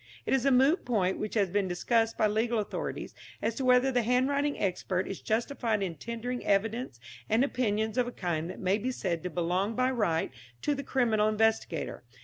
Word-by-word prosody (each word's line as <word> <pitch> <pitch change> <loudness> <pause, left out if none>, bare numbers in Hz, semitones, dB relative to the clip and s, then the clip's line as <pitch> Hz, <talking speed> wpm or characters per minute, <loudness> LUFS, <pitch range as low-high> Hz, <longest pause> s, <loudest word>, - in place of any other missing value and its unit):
It - - 0
is 270 0 +2
a - - +5
moot 270 +7 +4
point, 195 -6 0
which 215 +1 -4
has 200 -4 +2
been 200 0 +1
discussed 225 +5 +1
by - - +3
legal 225 +3 +1
authorities, 210 -1 -4 0.3
as 230 - -1
to 260 +3 -3
whether 250 +1 +5
the 245 -1 +2
handwriting 270 +5 +1
expert 185 -1 -1
is 195 - -6
justified 225 -2 0
in 180 -3 -2
tendering 235 - -5
evidence 210 - 0 0.3
and 225 +4 +4
opinions 220 -4 0
of 245 - +2
a - - -4
kind 170 -6 -2
that 185 - -7
may 190 +2 +1
be 245 +5 -2
said 170 -9 -2
to 180 - -4
belong 180 +6 -1
by 255 +2 +2
right 205 -10 0 0.3
to 295 - +2
the 280 - -3
criminal 225 -6 +2
investigator. 225 +1 0
225 Hz, 195 wpm, -29 LUFS, 195-250 Hz, 0.3 s, a